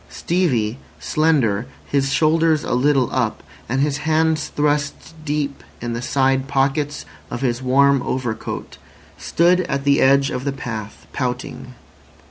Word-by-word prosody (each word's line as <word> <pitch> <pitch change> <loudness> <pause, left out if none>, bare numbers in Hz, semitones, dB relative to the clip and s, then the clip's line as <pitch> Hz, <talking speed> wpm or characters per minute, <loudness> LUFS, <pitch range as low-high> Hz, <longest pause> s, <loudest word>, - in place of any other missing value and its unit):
Stevie, 130 -10 0 0.2
slender, 130 -9 +1 0.2
his 135 -1 0
shoulders 160 +1 +3
a - - -2
little 135 0 +3
up, - - -1 0.3
and 130 +3 +1
his 145 0 +1
hands 160 0 +1
thrust 145 +1 -1
deep 145 -2 -2 0.2
in 120 0 -4
the 115 - -3
side 135 +1 +1
pockets 140 +1 0 0.2
of 120 - -5
his 120 -2 0
warm 140 +1 +4
overcoat, 125 -4 -4 0.4
stood 175 +2 +3
at 140 -1 -1
the 140 0 +3
edge 135 +1 +4
of 125 - -3
the 140 - -1
path, 110 -5 -7
pouting. 125 -1 -4
140 Hz, 135 wpm, -20 LUFS, 125-150 Hz, 0.4 s, warm